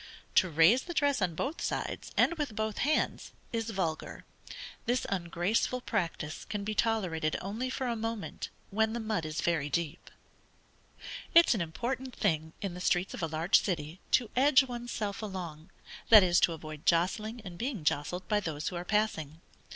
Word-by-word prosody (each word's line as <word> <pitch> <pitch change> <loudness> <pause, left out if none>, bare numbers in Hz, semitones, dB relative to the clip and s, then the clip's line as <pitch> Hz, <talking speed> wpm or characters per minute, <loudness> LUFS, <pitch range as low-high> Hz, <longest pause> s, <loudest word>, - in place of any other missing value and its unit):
To 185 - +4
raise 165 - +5
the 345 +3 -7
dress 285 -5 +2
on 175 -3 0
both 280 - -3
sides, - - -3
and - - +5
with 295 -9 -3
both 220 -1 -2
hands, 300 +3 0 0.2
is 225 -1 -1
vulgar. 180 -7 -3 0.6
This 245 +2 +1
ungraceful 185 +7 0
practice 170 -9 -3
can 210 -2 -4
be 215 +1 -2
tolerated 185 -9 0
only 220 +7 -3
for 260 0 -3
a 240 -2 0
moment, 225 -1 -4 0.2
when 220 +2 +1
the 235 - -2
mud 215 -8 -2
is 155 +1 -3
very 160 -4 0
deep. 170 +1 -3 1.3
It 335 0 +8
is - - +6
an 215 - -1
important 240 +10 -3
thing 160 -5 0
in 195 -3 -2
the 180 - -7
streets 180 0 +1
of - - -6
a 165 - 0
large 160 +4 +3
city 165 -2 -3
to 240 -4 +3
edge 265 +1 +6
one's 240 -2 -6
self 205 -1 -3
along; 175 -7 -6 0.4
that 215 -3 +10
is 175 -1 +4
to 170 - +3
avoid 155 -1 -9
jostling 210 +7 +1
and 180 -2 -7
being 230 - -3
jostled 170 +5 -1
by 210 - +2
those 160 -6 -3
who 180 - -7
are 175 - -4
passing. 180 -7 -1
195 Hz, 180 wpm, -31 LUFS, 165-230 Hz, 1.3 s, that